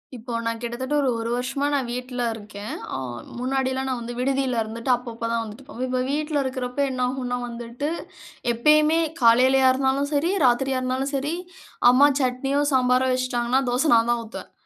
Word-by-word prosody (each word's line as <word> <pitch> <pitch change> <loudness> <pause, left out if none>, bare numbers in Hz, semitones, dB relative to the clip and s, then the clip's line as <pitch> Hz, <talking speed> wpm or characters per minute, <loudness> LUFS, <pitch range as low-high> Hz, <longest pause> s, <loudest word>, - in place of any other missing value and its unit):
இப்போ 240 +1 -8
நான் 230 0 -2
கிட்டத்தட்ட 250 +4 -3
ஒரு 270 - +1
1 230 0 -3
வருஷமா 270 +3 -2
நான் 270 -4 0
வீட்டில 250 0 -4
இருக்கேன், 210 -1 -8 0.2
ஆ - - -2 0.4
முன்னாடிலாம் 265 +1 -1
நான் 255 -2 -2
வந்து 235 +1 -5
விடுதியில 265 -2 0
இருந்துட்டு, 230 +4 -3
அப்பப்போ 235 -2 -6
தான் 230 - 0
வந்துட்டு 225 +5 -10
போவேன். 255 -2 -4
இப்ப 255 0 0
வீட்டுல 300 0 0
இருக்கிறப்போ 260 0 -3
என்னாகும்னா 250 -1 -1
வந்துட்டு, 240 +4 -5 0.6
எப்பயுமே 305 +6 +4 0.2
காலையிலயா 260 +3 +5
இருந்தாலும் 270 +2 0
சரி, 310 +6 +2
ராத்திரியா 260 +2 +2
இருந்தாலும் 260 +2 -1
சரி, 285 +4 -1 0.6
அம்மா 280 +3 +6
சட்னியோ 265 +2 0
சாம்பாரோ 255 0 +3
வச்சுட்டாங்கன்னா, 255 0 0
தோசை 255 +6 +1
நான் 230 +1 +3
தான் 240 -1 0
ஊத்துவேன். 220 - -9
255 Hz, 160 wpm, -24 LUFS, 240-270 Hz, 0.6 s, அம்மா